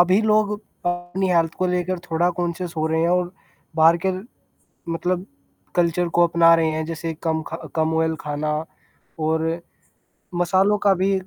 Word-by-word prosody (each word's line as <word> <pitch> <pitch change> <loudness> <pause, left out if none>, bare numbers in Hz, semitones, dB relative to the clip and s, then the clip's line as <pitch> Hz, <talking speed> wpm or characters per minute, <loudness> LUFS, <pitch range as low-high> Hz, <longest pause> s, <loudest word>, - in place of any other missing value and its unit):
अभी 185 +3 +5
लोग 215 -1 +3 0.3
अपनी 175 +2 -1
हेल्थ 165 -2 +2
को 185 - 0
लेकर 180 0 -1
थोड़ा 165 +2 +2
कॉन्शियस 175 0 -2
हो 155 0 0
रहे 160 0 +1
हैं 165 - +2
और 180 0 +1 0.4
बाहर 165 +1 +6
के 190 - +3 0.8
मतलब 180 +2 -1 0.5
कल्चर 175 0 +2
को 175 - +7
अपना 165 0 +5
रहे 165 -1 +2
हैं, 155 0 -2
जैसे 165 0 -4
कम 160 -1 0
ख - - -7 0.2
कम 160 0 +1
ऑयल 160 0 +1
खाना 150 0 -2 0.7
और 160 +1 0 0.9
मसालों 190 +4 +3
का 200 - +6
भी 195 +1 +3
170 Hz, 160 wpm, -22 LUFS, 160-180 Hz, 0.9 s, को